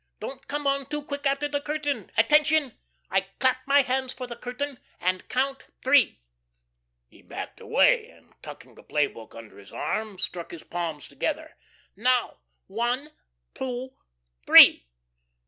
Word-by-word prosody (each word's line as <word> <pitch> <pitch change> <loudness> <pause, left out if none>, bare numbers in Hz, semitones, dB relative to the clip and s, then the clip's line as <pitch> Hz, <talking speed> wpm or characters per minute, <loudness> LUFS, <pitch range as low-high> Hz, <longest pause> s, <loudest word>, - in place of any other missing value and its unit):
Don't 270 0 -8
come 290 0 -3
on 275 -1 0
too 295 0 -4
quick 285 0 -3
after 275 +1 0
the 285 0 -2
curtain. 290 -7 -3
Attention. 295 +3 +3 0.4
I 195 - +3 0.2
clap 260 -1 +3
my 280 0 +5
hands 260 0 -1
for 255 - -7
the 240 -1 -8
curtain, 250 +3 -5 0.2
and 185 +1 -2
count 270 +1 -1 0.2
three." 260 - +4 0.9
He - - -21
backed - - -8
away - - +3
and, - - -22
tucking - - -11
the - - -16
play 150 -1 +1
book 115 -5 -12
under 115 -3 -12
his 100 - -15
arm, 215 -3 -3
struck 175 -2 -4
his 170 - -10
palms 165 -5 -5
together. - - -4 0.4
"Now, 250 +4 +1 0.3
one 240 +8 -2 0.4
two 260 0 -5 0.5
_three. - - +9
255 Hz, 145 wpm, -26 LUFS, 195-280 Hz, 0.9 s, three